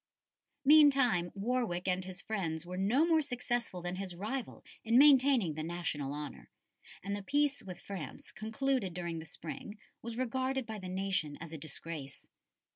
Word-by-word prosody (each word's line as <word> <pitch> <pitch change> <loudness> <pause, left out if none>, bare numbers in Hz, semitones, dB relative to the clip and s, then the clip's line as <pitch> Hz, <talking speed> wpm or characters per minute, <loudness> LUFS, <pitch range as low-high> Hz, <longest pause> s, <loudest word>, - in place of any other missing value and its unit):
Meantime 275 - +6
Warwick 200 -4 -1
and 185 0 +1
his 185 0 -8
friends 170 -7 -2
were 180 +1 -6
no 215 - +3
more 325 -2 +4
successful 240 - -2
than 175 +1 -3
his 190 -2 -4
rival 225 +8 -4 0.2
in 230 +1 +4
maintaining 265 - +6
the 155 - -4
national 160 -4 -3
honour, 145 - -6 0.5
and 200 +1 -2
the 205 - -4
peace 285 +6 +1
with 180 -2 -8
France 185 -9 -7
concluded 220 -3 -1
during 170 -2 -3
the 160 - -8
spring 165 +6 -8 0.2
was 230 0 -6
regarded 260 +1 -1
by 220 -2 -6
the 185 -1 -6
nation 185 -6 -1
as 165 0 -8
a - - -4
disgrace. 150 -2 -6
195 Hz, 160 wpm, -33 LUFS, 170-250 Hz, 0.5 s, Meantime